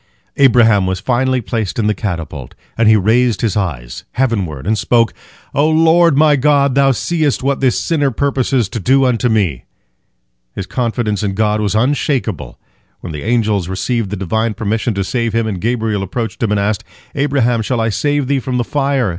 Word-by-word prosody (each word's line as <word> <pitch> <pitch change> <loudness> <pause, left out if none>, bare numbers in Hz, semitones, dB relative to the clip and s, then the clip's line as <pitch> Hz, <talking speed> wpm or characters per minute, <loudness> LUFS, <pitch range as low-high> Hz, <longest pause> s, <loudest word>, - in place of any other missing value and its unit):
Abraham 115 -7 +4
was 95 0 -2
finally 130 +1 0
placed 110 -3 -3
in 115 - 0
the 105 - +2
catapult, 80 - -5 0.2
and 115 -1 +3
he 110 - +6
raised 110 +2 +2
his 110 -6 0
eyes 65 -12 -4
heavenward, 100 - -1
and 110 +3 +1
spoke, 115 +2 +1 0.4
"O 145 +3 +2
Lord 165 -1 +4
my 150 0 +5
God, 140 0 +2
Thou 135 0 +3
seest 150 +2 0
what 140 0 0
this 130 -3 +1
sinner 145 -5 0
purposes 130 -2 0
to 115 - -4
do 135 +7 +3
unto 125 -1 +1
me!" 95 - 0 0.9
His 95 - -4
confidence 115 -3 -2
in 100 -2 -2
God 105 0 +1
was 105 0 -1
unshakable. 115 - -1 0.4
When 85 - -7
the 75 - -6
angels 110 -5 0
received 100 +3 -2
the 105 - -3
Divine 110 +4 -1
permission 110 +1 -2
to 100 - -1
save 115 +2 -2
him, 115 0 +1
and 100 -5 -4
Gabriel 110 -3 -1
approached 115 +4 -4
him, 115 - +1
and 105 -1 +1
asked, 100 +1 -1 0.3
"Abraham, 135 -5 +1
shall 120 +2 -1
I 115 0 +1
save 145 +5 0
thee 140 0 +1
from 130 0 -3
the 120 - +1
fire?" 135 -3 0
115 Hz, 185 wpm, -16 LUFS, 105-135 Hz, 0.9 s, he